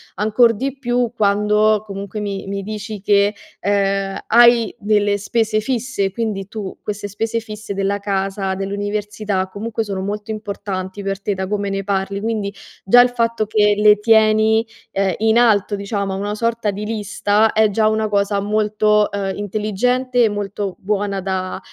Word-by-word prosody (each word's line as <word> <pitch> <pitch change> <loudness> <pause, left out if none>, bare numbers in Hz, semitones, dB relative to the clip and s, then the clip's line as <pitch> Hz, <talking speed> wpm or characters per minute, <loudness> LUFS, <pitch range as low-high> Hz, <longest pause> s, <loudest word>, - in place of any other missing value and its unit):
Ancor 220 +3 +3
di 270 +5 -4
più 245 -2 0
quando 210 +1 +3
comunque 200 0 -6
mi 200 -2 -4
mi 200 0 -3
dici 210 0 -6
che, 200 0 +3 0.3
ehm, 195 -1 0
hai 235 -1 +5
delle 205 -1 +1
spese 215 +1 0
fisse; 235 -4 -2
quindi 200 -2 -3
tu 200 -2 -7
queste 205 -1 -4
spese 225 +3 -2
fisse 215 -2 -7
della 195 +1 0
casa, 195 -1 -2
dell'università, 205 0 -3
comunque 225 +2 -3
sono 195 -3 -4
molto 205 +2 -4
importanti 200 -2 -5
per 195 -1 -3
te 205 +1 -2
da 190 0 -3
come 200 0 -2
ne 195 0 -2
parli, 195 0 -2
quindi 215 -3 -2 0.3
già 245 +5 +7
il 245 - +4
fatto 230 -2 -1
che 210 -1 +3
le 210 0 +5
tieni, 220 0 +4 0.3
ehm, 195 -3 0
in 220 +1 +3
alto 210 -3 +3
diciamo, 200 -1 -3
a - - -3
una 205 +1 -3
sorta 230 -1 -1
di 205 +1 -4
lista, 210 0 +1
è 215 -1 +3
già 215 +1 +2
una 220 0 +1
cosa 200 -1 +1
molto, 210 0 +2
ehm, 195 -1 -2
intelligente 235 +5 0
e - - +2
molto 205 -1 -4
buona 200 -1 -2
da, 185 -1 -3
210 Hz, 165 wpm, -19 LUFS, 200-220 Hz, 0.3 s, già